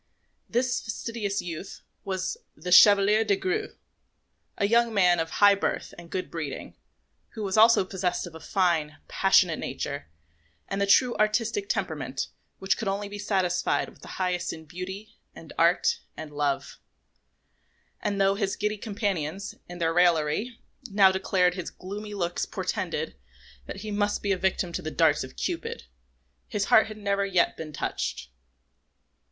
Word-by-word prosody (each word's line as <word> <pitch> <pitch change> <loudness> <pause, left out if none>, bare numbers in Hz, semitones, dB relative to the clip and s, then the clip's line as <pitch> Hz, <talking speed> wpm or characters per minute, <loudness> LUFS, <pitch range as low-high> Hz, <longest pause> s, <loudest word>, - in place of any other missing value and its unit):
This 245 +1 0
fastidious 220 -3 -3
youth 175 +2 -7 0.2
was 190 - -2 0.2
the 180 - -6
Chevalier 205 +3 +7
des 205 -2 +2
Grieux, 185 -1 -2 0.8
a 200 - +2
young 235 +2 +3
man 180 -3 +4
of 165 0 -1
high 205 +4 +6
birth 200 - -2
and 170 0 -12
good 185 +1 -4
breeding, 155 -5 -5 0.6
who 220 - -5
was 195 -2 -1
also 220 -2 +6
possessed 180 -2 -2
of 175 - -10
a 160 - -9
fine, 160 -3 0
passionate 185 -4 +3
nature 140 +2 -4 0.6
and 195 0 -2
the 200 - +2
true 245 +4 +5
artistic 230 - +1
temperament - - -2 0.3
which 190 0 0
could 225 - -3
only 200 +1 -2
be 205 0 -7
satisfied 190 -3 0
with - - -20
the - - -11
highest 180 -1 -1
in 160 -1 -9
beauty, 190 +6 -8 0.2
and - - -11
art, 470 0 +3 0.2
and 155 -1 -7
love; 145 -1 -2 1.2
and 200 -1 -1
though 195 0 +4
his 200 -1 -1
giddy 210 0 -2
companions, 200 -4 -3 0.2
in 175 - -7
their 165 -1 0
raillery, 175 +6 +2 0.3
now 195 -1 +6
declared 190 -1 +2
his 180 -2 -5
gloomy 205 +3 -7
looks 175 -3 -2
portended - - -3 0.5
that - - -7
he 215 0 -5
must 205 0 0
be 200 - 0
a - - +3
victim 185 -2 0
to - - -3
the 155 - -4
darts 155 -2 +3
of 130 - -10
Cupid, 455 +7 -3 0.6
his 205 -2 -1
heart 220 - +5
had 215 -1 -8
never 200 -1 0
yet 185 -3 +2
been 155 -1 -7
touched. 140 - -3
195 Hz, 160 wpm, -27 LUFS, 175-210 Hz, 1.2 s, Chevalier